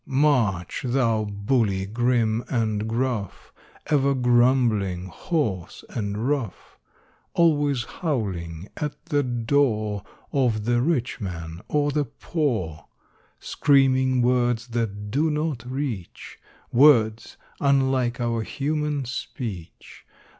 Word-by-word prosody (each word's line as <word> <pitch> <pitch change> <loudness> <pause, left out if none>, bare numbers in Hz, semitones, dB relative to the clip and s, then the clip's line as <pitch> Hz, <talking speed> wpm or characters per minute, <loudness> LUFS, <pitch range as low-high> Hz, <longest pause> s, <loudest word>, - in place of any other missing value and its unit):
March, 125 - +1
thou 120 -4 +1
bully 100 -1 0
grim 115 +1 +1
and 110 -3 -1
gruff, 115 -4 -3 0.3
Ever 140 -2 +2
grumbling, 120 -7 +2
hoarse, 100 - -3
and 105 +2 -2
rough! 135 -9 -3 0.6
Always 145 -6 +3
howling 95 - -3
at 150 -2 -3
the 145 -4 +1
door 115 -4 0 0.3
Of 120 -6 +1
the 120 0 +2
rich 130 -4 0
man 85 -3 -6
or 145 -1 +1
the 145 0 0
poor; 115 - -2 0.5
Screaming 130 -2 +3
words 120 -1 +1
that 105 -3 -3
do 150 +6 +2
not 150 -5 -2
reach— 130 -9 -5 0.3
Words 115 -5 +4 0.2
unlike 135 -3 +2
our 115 -1 0
human 150 +3 -2
speech. 115 - -7
120 Hz, 100 wpm, -24 LUFS, 105-140 Hz, 0.6 s, Words